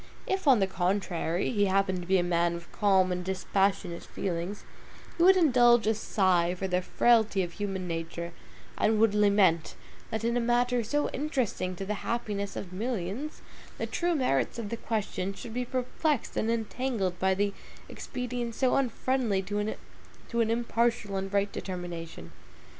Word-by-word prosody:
If, 380 Hz, -4 st, -2 dB
on 265 Hz, -3 st, +7 dB
the 195 Hz, -, +3 dB
contrary, 180 Hz, -2 st, -1 dB
he 205 Hz, -4 st, +2 dB
happened 190 Hz, -1 st, +1 dB
to 175 Hz, -, -9 dB
be 190 Hz, 0 st, +4 dB
a 175 Hz, -, +2 dB
man 170 Hz, -1 st, +1 dB
of 170 Hz, 0 st, -10 dB
calm 190 Hz, -3 st, +3 dB
and 180 Hz, 0 st, -2 dB
dispassionate 190 Hz, -1 st, 0 dB
feelings, 180 Hz, +2 st, -4 dB, 0.5 s
he -, -, -3 dB
would 375 Hz, +2 st, +7 dB
indulge 240 Hz, -, +5 dB
a 220 Hz, -, +3 dB
sigh 185 Hz, -5 st, +1 dB
for 190 Hz, +1 st, -3 dB
the 180 Hz, 0 st, +1 dB
frailty 220 Hz, 0 st, +3 dB
of 175 Hz, -, -5 dB
human 195 Hz, -3 st, -3 dB
nature, 170 Hz, 0 st, -4 dB, 0.5 s
and 215 Hz, 0 st, +3 dB
would 220 Hz, -2 st, +4 dB
lament, 200 Hz, -6 st, +3 dB, 0.3 s
that 220 Hz, 0 st, -3 dB
in 235 Hz, +1 st, +1 dB
a -, -, +2 dB
matter 240 Hz, 0 st, +2 dB
so 290 Hz, +7 st, 0 dB
interesting 250 Hz, -, -2 dB
to 195 Hz, -, -5 dB
the 210 Hz, -, -1 dB
happiness 210 Hz, -4 st, -3 dB
of 180 Hz, -2 st, -6 dB
millions, 225 Hz, -, -4 dB, 0.3 s
the -, -, -2 dB
true 345 Hz, -1 st, 0 dB
merits 245 Hz, -, +1 dB
of 225 Hz, -3 st, -4 dB
the 230 Hz, -, -3 dB
question 200 Hz, -4 st, -2 dB
should 235 Hz, 0 st, -8 dB
be 250 Hz, +1 st, -2 dB
perplexed 255 Hz, +3 st, -1 dB
and 220 Hz, -, 0 dB
entangled 225 Hz, -4 st, -1 dB
by 190 Hz, +2 st, +1 dB, 0.3 s
expedients 245 Hz, -2 st, -5 dB
so 260 Hz, -2 st, +3 dB
unfriendly 255 Hz, -5 st, 0 dB
to 205 Hz, +2 st, -2 dB
an 220 Hz, +2 st, -4 dB
impartial 230 Hz, -2 st, 0 dB
and 195 Hz, 0 st, -3 dB
right 200 Hz, 0 st, +1 dB
determination. 170 Hz, -, -6 dB
205 Hz, 160 wpm, -29 LUFS, 185-240 Hz, 0.5 s, on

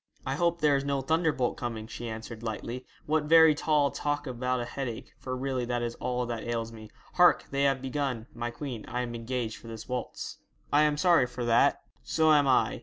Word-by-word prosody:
'I 130 Hz, -, -1 dB
hope 170 Hz, 0 st, +1 dB
there 150 Hz, -2 st, +4 dB
is 135 Hz, -, 0 dB
no 140 Hz, -1 st, 0 dB
thunderbolt 160 Hz, -3 st, +1 dB
coming,' 115 Hz, -3 st, -4 dB
she 120 Hz, +1 st, -6 dB
answered, 110 Hz, 0 st, -7 dB
lightly. 115 Hz, +3 st, -5 dB, 0.2 s
'What 155 Hz, 0 st, +1 dB
very 160 Hz, 0 st, +7 dB
tall 150 Hz, -2 st, +2 dB
talk 145 Hz, 0 st, -2 dB
about 125 Hz, -1 st, -1 dB
a 120 Hz, -, -2 dB
headache, 125 Hz, -2 st, -5 dB
for 130 Hz, -1 st, -4 dB
really 130 Hz, -1 st, -1 dB
that 120 Hz, 0 st, -1 dB
is 120 Hz, 0 st, -2 dB
all 125 Hz, 0 st, -1 dB
that 120 Hz, -2 st, -4 dB
ails 115 Hz, -1 st, -2 dB
me. 110 Hz, -1 st, -11 dB, 0.2 s
Hark, 175 Hz, -1 st, +5 dB
they 140 Hz, 0 st, +1 dB
have 135 Hz, -1 st, +1 dB
begun 135 Hz, -4 st, -2 dB
"My 120 Hz, 0 st, -3 dB
Queen." 120 Hz, -2 st, -6 dB
I 125 Hz, -, -2 dB
am 120 Hz, -1 st, -4 dB
engaged 115 Hz, -1 st, -3 dB
for -, -, -13 dB
this 115 Hz, -1 st, -8 dB
waltz.' 125 Hz, -2 st, -5 dB, 0.3 s
'I 145 Hz, -, +6 dB
am 150 Hz, -1 st, +3 dB
sorry 165 Hz, -5 st, +4 dB
for 125 Hz, -1 st, -5 dB
that.' 115 Hz, 0 st, +3 dB, 0.2 s
'So 155 Hz, -, +3 dB
am 145 Hz, -2 st, +4 dB
I. 120 Hz, -5 st, +3 dB
125 Hz, 210 wpm, -29 LUFS, 120-145 Hz, 0.3 s, very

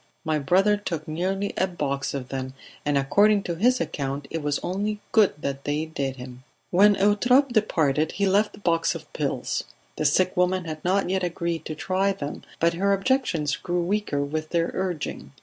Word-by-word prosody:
"My 155 Hz, -1 st, +1 dB
brother 190 Hz, +8 st, +3 dB
took 165 Hz, -6 st, -4 dB
nearly 190 Hz, +5 st, -2 dB
a 190 Hz, -, +3 dB
box 140 Hz, -6 st, -2 dB
of 130 Hz, -2 st, -5 dB
them, 130 Hz, 0 st, -4 dB, 0.3 s
and 145 Hz, -1 st, +1 dB
according 200 Hz, +9 st, +4 dB
to 170 Hz, -, -2 dB
his 245 Hz, +9 st, +2 dB
account 140 Hz, 0 st, -3 dB
it 165 Hz, -, -2 dB
was 145 Hz, -1 st, 0 dB
only 205 Hz, +3 st, -2 dB
good 215 Hz, -3 st, +4 dB
they 145 Hz, +3 st, -2 dB
did 140 Hz, -4 st, -3 dB
him." 125 Hz, 0 st, -10 dB, 0.3 s
When 200 Hz, +3 st, +6 dB
Eutrope 245 Hz, +8 st, +4 dB
departed 160 Hz, -, +1 dB
he 200 Hz, -, 0 dB
left 205 Hz, +2 st, +2 dB
the -, -, -13 dB
box 165 Hz, -3 st, +1 dB
of -, -, -10 dB
pills; -, -, -2 dB, 0.3 s
the 155 Hz, -, -1 dB
sick 185 Hz, +5 st, +3 dB
woman 180 Hz, 0 st, +1 dB
had 155 Hz, -1 st, -6 dB
not 190 Hz, +3 st, +1 dB
yet 190 Hz, 0 st, +1 dB
agreed 170 Hz, -1 st, -2 dB
to 155 Hz, -, -4 dB
try 190 Hz, +4 st, 0 dB
them, 145 Hz, -6 st, -6 dB, 0.2 s
but 170 Hz, +1 st, +3 dB
her 200 Hz, +4 st, +2 dB
objections 195 Hz, -, +1 dB
grew 175 Hz, -1 st, -2 dB
weaker 180 Hz, -6 st, 0 dB
with 155 Hz, +2 st, -3 dB
their 170 Hz, -1 st, 0 dB
urging. 180 Hz, -5 st, -4 dB
175 Hz, 185 wpm, -25 LUFS, 150-200 Hz, 0.3 s, When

